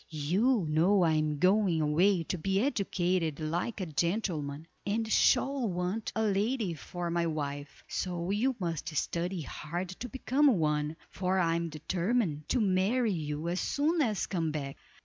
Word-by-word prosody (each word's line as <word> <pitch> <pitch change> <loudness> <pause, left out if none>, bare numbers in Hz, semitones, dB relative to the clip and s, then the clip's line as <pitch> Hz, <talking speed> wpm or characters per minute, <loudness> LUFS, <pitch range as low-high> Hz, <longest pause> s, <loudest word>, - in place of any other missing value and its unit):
You 185 - +1
know 175 +6 +3
I 165 - +3
am 155 -1 +1
going 185 0 +3
away 165 +4 +3
to 175 - -3
be 195 +4 +1
educated 185 - 0
like 170 +9 -2
a 185 - -2
gentleman, 160 -3 -2 0.2
and 220 +2 -1
shall 270 0 +3
want 180 +4 -2
a 220 - +1
lady 210 0 0
for 175 +2 -5
my 170 0 +1
wife; 145 -2 -4
so 175 0 -2
you 245 +6 +1
must 165 -4 -3
study 175 +4 -1
hard 170 +5 -5
to 225 +7 -7
become 265 +1 +2
one, 150 -1 0 0.2
for 185 0 0
I 170 -3 +2
am 170 0 -1
determined 170 +1 -1
to 255 - +2
marry 210 +3 +2
you 150 -1 -3
as 175 +2 -1
soon 315 +3 +1
as 215 -8 +1
I - - -17
come 165 -3 0
back. 140 -2 -4
180 Hz, 165 wpm, -30 LUFS, 155-210 Hz, 0.2 s, know